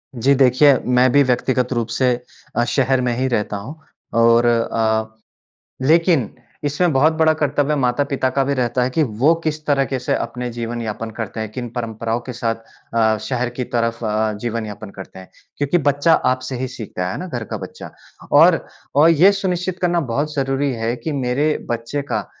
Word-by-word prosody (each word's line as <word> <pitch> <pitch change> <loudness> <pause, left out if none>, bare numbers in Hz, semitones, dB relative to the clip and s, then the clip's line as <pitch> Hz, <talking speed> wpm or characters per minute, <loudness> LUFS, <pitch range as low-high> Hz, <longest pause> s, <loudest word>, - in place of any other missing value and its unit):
जी 130 +4 +3
देखिए, 130 +1 +5
मैं 125 +1 +4
भी 145 - +5
व्यक्तिगत 125 0 0
रूप 120 -1 -1
से 125 +1 +2 0.4
अ, 120 - +2
शहर 130 0 +1
में 125 -1 0
ही 130 +1 0
रहता 105 -4 -1
हूँ 120 +10 -8 0.4
और 115 +1 +5
अ, 110 -1 +1 0.7
लेकिन 165 - +3 0.3
इसमें 150 +4 +1
बहुत 145 +4 +4
बड़ा 160 0 +3
कर्तव्य 145 0 0
माता-पिता 135 +1 0
का 135 - +4
भी 140 - 0
रहता 125 -1 0
है 125 - 0
कि 155 +5 +1
वो 135 +5 +2
किस 155 0 -2
तरीके 135 -2 +1
से 125 - -1
अपने 125 +1 -3
जीवन 120 0 -4
यापन 110 +1 -4
करते 110 -1 -5
हैं, 110 -1 -4
किन 120 0 -5
परंपराओं 115 0 -3
के 125 - -3
साथ 115 -1 -1 0.4
अ, 110 -1 +3
शहर 125 -2 -1
की 125 - 0
तरफ 115 0 0
अ, 110 0 0
जीवन 115 -1 -3
यापन 105 0 -8
करते 95 -1 -10
हैं। 95 - -12 0.3
क्योंकि 145 +5 +2
बच्चा 145 +4 +3 0.2
आपसे 130 0 -4
ही 130 0 -3
सीखता 110 -7 -5
है, 90 - -3
है - - -5
ना? 185 - -5
घर 120 -9 -4
का 110 - -5
बच्चा। 95 - -9 0.4
और - - +7 0.4
अ, 150 +3 +6
ये 170 +5 +6
सुनिश्चित 185 -2 -2
करना 175 -1 +2
बहुत 150 +5 -1
ज़रूरी 135 0 0
है 115 0 -2
कि 160 - -1
मेरे 135 +2 0 0.2
बच्चे 120 +5 -2
का - - -1
125 Hz, 190 wpm, -20 LUFS, 115-145 Hz, 0.7 s, और